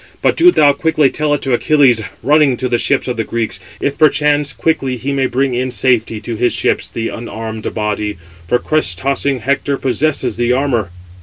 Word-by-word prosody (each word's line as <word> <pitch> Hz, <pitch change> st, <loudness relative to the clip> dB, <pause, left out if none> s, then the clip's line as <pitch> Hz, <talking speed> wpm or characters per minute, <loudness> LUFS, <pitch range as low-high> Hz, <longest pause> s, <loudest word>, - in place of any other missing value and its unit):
But -, -, +3 dB
do 345 Hz, +2 st, +6 dB
thou 145 Hz, -, +4 dB
quickly 155 Hz, -3 st, +1 dB
tell 150 Hz, -1 st, -1 dB
it -, -, -6 dB
to 135 Hz, -, 0 dB
Achilles, 130 Hz, -3 st, +3 dB, 0.2 s
running 145 Hz, -3 st, +3 dB
to 130 Hz, -, -2 dB
the 120 Hz, -1 st, 0 dB
ships 140 Hz, +1 st, 0 dB
of 125 Hz, -1 st, -3 dB
the 115 Hz, -, 0 dB
Greeks, 115 Hz, 0 st, -2 dB, 0.2 s
if 140 Hz, -, -2 dB
perchance 150 Hz, -1 st, +3 dB
quickly 135 Hz, -6 st, -1 dB
he 135 Hz, +4 st, -3 dB
may 135 Hz, -1 st, +1 dB
bring 135 Hz, +1 st, 0 dB
in 125 Hz, +1 st, -1 dB
safety 120 Hz, -4 st, 0 dB
to 115 Hz, +1 st, -5 dB
his 120 Hz, +2 st, +1 dB
ships -, -, -1 dB
the 115 Hz, 0 st, -3 dB
unarmed 110 Hz, -1 st, -6 dB
body; 105 Hz, -1 st, -2 dB, 0.3 s
for 125 Hz, -, +2 dB
crest 125 Hz, -, 0 dB
tossing 135 Hz, 0 st, -1 dB
Hector 140 Hz, +2 st, -1 dB
possesses 135 Hz, -3 st, -1 dB
the 120 Hz, +1 st, +1 dB
armour." 125 Hz, -8 st, 0 dB
130 Hz, 190 wpm, -15 LUFS, 115-145 Hz, 0.3 s, do